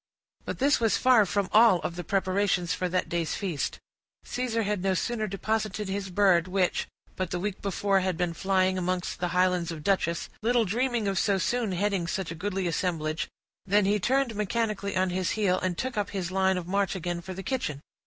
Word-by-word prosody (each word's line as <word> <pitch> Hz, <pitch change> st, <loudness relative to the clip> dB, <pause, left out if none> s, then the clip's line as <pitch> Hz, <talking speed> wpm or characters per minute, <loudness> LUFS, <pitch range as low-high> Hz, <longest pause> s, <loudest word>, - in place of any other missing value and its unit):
But -, -, -4 dB
this 280 Hz, +2 st, +3 dB
was 225 Hz, -2 st, +2 dB
far 245 Hz, -6 st, +5 dB
from 200 Hz, +1 st, 0 dB
all 220 Hz, -3 st, +7 dB
of 170 Hz, -, -3 dB
the 175 Hz, -, -5 dB
preparations 190 Hz, -3 st, +1 dB
for 180 Hz, -, -2 dB
that 185 Hz, +1 st, 0 dB
day's 170 Hz, -2 st, -1 dB
feast; 180 Hz, -8 st, -2 dB, 0.5 s
Caesar 240 Hz, -2 st, -1 dB
had 205 Hz, -2 st, -1 dB
no 190 Hz, 0 st, +1 dB
sooner 220 Hz, +2 st, -1 dB
deposited 210 Hz, +1 st, -2 dB
his 195 Hz, 0 st, -3 dB
bird, 185 Hz, -2 st, +3 dB
which, 185 Hz, -1 st, 0 dB, 0.3 s
but 185 Hz, -2 st, -2 dB
the 180 Hz, -, -2 dB
week 200 Hz, +1 st, -3 dB
before, 200 Hz, 0 st, +1 dB
had 185 Hz, -2 st, -1 dB
been 175 Hz, -2 st, 0 dB
flying 185 Hz, 0 st, +1 dB
amongst 180 Hz, 0 st, -2 dB
the 180 Hz, -, 0 dB
highlands 180 Hz, -1 st, +1 dB
of 160 Hz, -3 st, -6 dB
Dutchess, 170 Hz, -3 st, 0 dB
little 235 Hz, +1 st, +2 dB
dreaming 235 Hz, +2 st, 0 dB
of 195 Hz, -1 st, +1 dB
so 200 Hz, -2 st, +2 dB
soon 225 Hz, +2 st, 0 dB
heading 195 Hz, -1 st, 0 dB
such 190 Hz, -1 st, -3 dB
a -, -, -3 dB
goodly 190 Hz, +2 st, -3 dB
assemblage, 165 Hz, -3 st, -1 dB, 0.4 s
than 205 Hz, +1 st, +4 dB
he 205 Hz, +2 st, +2 dB
turned 260 Hz, +3 st, +1 dB
mechanically 210 Hz, -1 st, -1 dB
on 185 Hz, 0 st, +1 dB
his 185 Hz, 0 st, 0 dB
heel, 185 Hz, -4 st, +2 dB
and 180 Hz, -2 st, -2 dB
took 260 Hz, 0 st, -3 dB
up 205 Hz, -, -1 dB
his 185 Hz, -3 st, -3 dB
line 190 Hz, 0 st, +2 dB
of 180 Hz, -, -4 dB
march 195 Hz, 0 st, 0 dB
again 175 Hz, -1 st, -3 dB
for 185 Hz, +1 st, -7 dB
the 195 Hz, -, -6 dB
kitchen. 210 Hz, -, -2 dB
190 Hz, 205 wpm, -27 LUFS, 180-210 Hz, 0.5 s, all